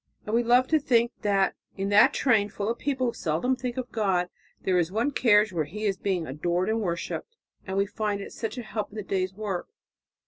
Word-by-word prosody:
And 210 - -4
we 235 - +4
love 245 +2 +4
to 315 - +4
think 240 -3 +2
that 200 -2 +2 0.2
in 195 +1 -1
that 210 +7 +6
train, 220 -8 +2
full 205 0 -3
of 235 - -5
people 270 -3 -1
who - - -5
seldom 170 +12 0
think 250 -1 -5
of 255 -1 -4
God, 190 -5 +1 0.3
there 185 -1 +2
is 170 0 0
one 230 +8 0
carriage 210 -6 +4
where 160 -3 0
He 210 +8 -5
is 195 -2 +1
being 185 -4 -1
adored 175 +7 -1
and 225 +1 0
worshipped. 185 - -4 0.3
And 190 +1 -2
we 200 - +3
find 205 0 -2
it 200 - -8
such 225 0 -4
a 245 - -4
help 215 -1 -4
in 210 - -15
the 210 - -4
day's 190 -1 -2
work." 200 -4 -3
210 Hz, 230 wpm, -27 LUFS, 190-235 Hz, 0.3 s, that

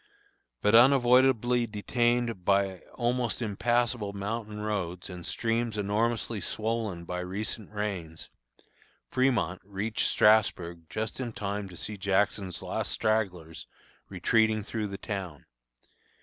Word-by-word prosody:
But 105 - +3
unavoidably 125 -1 +5
detained 120 0 0
by 100 -1 +2 0.2
almost 120 -1 0
impassable 120 -1 0
mountain 105 +1 -4
roads 95 -4 -3
and 90 -1 -8
streams 115 +1 -1
enormously 105 +1 0
swollen 110 -6 -2
by 90 +1 -4
recent 100 +4 -4
rains, 95 -6 -4 0.8
Fremont 120 -9 +1
reached 100 +3 -1
Strasburg 90 -6 +3
just 110 +2 -4
in 120 -3 -4
time 100 -1 -3
to 90 - -11
see 105 +4 -5
Jackson's 100 -1 0
last - - -2
stragglers 90 -7 -1 0.4
retreating 110 -1 +2
through 110 0 -3
the 100 -1 -6
town. 95 -8 -5
105 Hz, 110 wpm, -29 LUFS, 95-115 Hz, 0.8 s, unavoidably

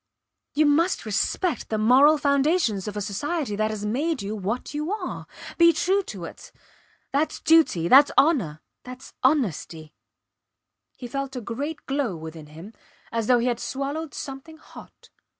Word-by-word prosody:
You 305 +1 +4
must 320 +3 +2
respect 220 - -1
the 220 - -1
moral 260 +8 +5
foundations 280 - +1
of 210 0 -5
a - - -2
society 235 - -3
that 215 +1 0
has 210 -1 -4
made 270 +4 -1
you 205 +2 -4
what 215 +7 -4
you 300 +4 -3
are. 410 -4 -5 0.3
Be 335 0 +7
true 385 +4 +1
to 190 -5 -7
it. - - -11 0.6
Thats 295 +3 0
duty 315 - +3
thats 275 +8 +7
honour 220 - +2 0.2
thats 255 +1 -11
honesty. 175 - 0 1.0
He 245 - -7
felt 275 +1 -4
a - - -3
great 280 +8 -5
glow 270 -8 -1
within 160 -1 -9
him, 165 +8 -12 0.4
as 230 -2 -2
though 250 - +5
he 235 - 0
had 240 -2 0
swallowed 280 +5 -4
something 275 +3 -8
hot. - - -16
260 Hz, 155 wpm, -24 LUFS, 210-300 Hz, 1.0 s, Be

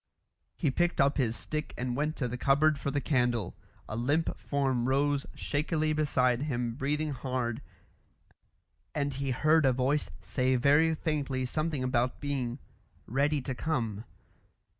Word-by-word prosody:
He 150 -6 0
picked 175 +5 0
up 140 +1 +3
his 120 -5 +1
stick 150 +3 -4
and 125 0 -2
went 150 +3 -1
to 125 - -1
the 120 - -4
cupboard 140 +3 +3
for 140 - -2
the 145 +1 0
candle. 125 - 0 0.3
A 110 - -5
limp 145 +8 +1
form 130 -3 0
rose 140 +1 +1
shakily 155 +1 0
beside 130 -5 +2
him 125 -5 -1
breathing 150 +4 -1
hard, 125 -3 -2 1.3
and 140 -2 0
he 135 +1 -3
heard 155 +5 +3
a 135 - +5
voice 135 +4 +1
say 130 -1 0
very 145 +5 +4
faintly 145 -5 -1
something 155 0 -1
about 125 -1 0
being 135 -4 -2 0.5
"ready 140 +3 +1
to 130 - -3
come." 115 -8 -2
140 Hz, 145 wpm, -30 LUFS, 125-150 Hz, 1.3 s, a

